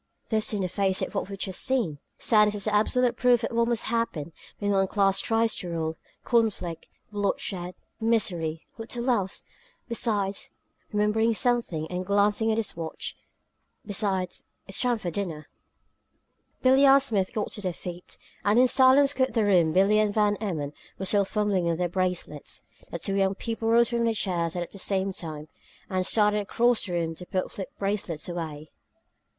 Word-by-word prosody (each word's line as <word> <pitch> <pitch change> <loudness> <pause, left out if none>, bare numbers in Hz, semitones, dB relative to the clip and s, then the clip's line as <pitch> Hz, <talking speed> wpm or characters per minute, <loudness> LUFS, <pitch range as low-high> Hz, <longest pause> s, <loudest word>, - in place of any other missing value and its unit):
This, 220 -1 +2
in 205 -3 -1
the - - 0
face 190 +1 0
of - - -4
what - - -2
we've 195 - -6
just 190 -1 -2
seen! 230 - 0 0.2
Sanus 210 -2 +3
is 205 0 -3
absolute 235 +4 +2
proof 245 -2 +3
of 230 - -2
what 235 0 +3
must 235 -2 +1
happen 215 -9 -2 0.2
when 205 0 -1
one 195 -1 +3
class 195 -1 +2
tries 225 0 +1
to 180 - -4
rule; 160 -1 -2 0.3
conflict, 220 -8 0 0.2
bloodshed, 195 -3 -2 0.2
misery 175 -8 0
little 235 +2 -3
else! 195 -6 -1 0.4
Besides" 210 -4 -1 0.4
remembering 215 +2 +2
something, 235 - 0
and 180 +1 -2
glancing 205 +3 +2
at 220 - 0
his 225 - -2
watch 165 -1 -5 0.7
"besides, 195 -3 -2 0.2
it's 195 - 0
time 245 -2 +2
for 180 -5 -4
dinner." 165 -5 -4 1.1
Billie 265 +2 +6
and 275 +1 +8
Smith 210 -9 -1
got 215 - -3
to 205 - -6
their 185 -2 -1
feet, 175 +1 -8 0.3
and 205 +3 +3
in 255 +1 +6
silence 265 +2 +5
quit 260 -2 0
the 225 -2 +3
room 175 -5 +4
Billie 195 +5 +4
and 215 -1 +2
Van 210 -1 +3
Emmon 155 -9 -3 0.2
were 190 - -4
still 200 +1 +2
fumbling 205 -3 0
with 170 -1 0
their 180 0 0
bracelets. 180 -4 -3 0.3
The - - -4
two 195 +4 -2
young 195 0 +2
people 225 +1 -3
rose 235 +1 +5
from 235 -1 0
the 225 -1 +1
chairs 175 -5 -1
at 175 -1 -4
the 200 - -7
same 195 0 0
time 155 -4 -7 0.4
and 185 0 0
started 210 -1 +3
across 230 +3 +1
the 180 - -4
room 165 -1 -1
to 180 +2 -10
put 185 -1 -2
flip 190 - -6
bracelets 195 -6 -2
away. 160 -4 -6
200 Hz, 175 wpm, -27 LUFS, 180-225 Hz, 1.1 s, and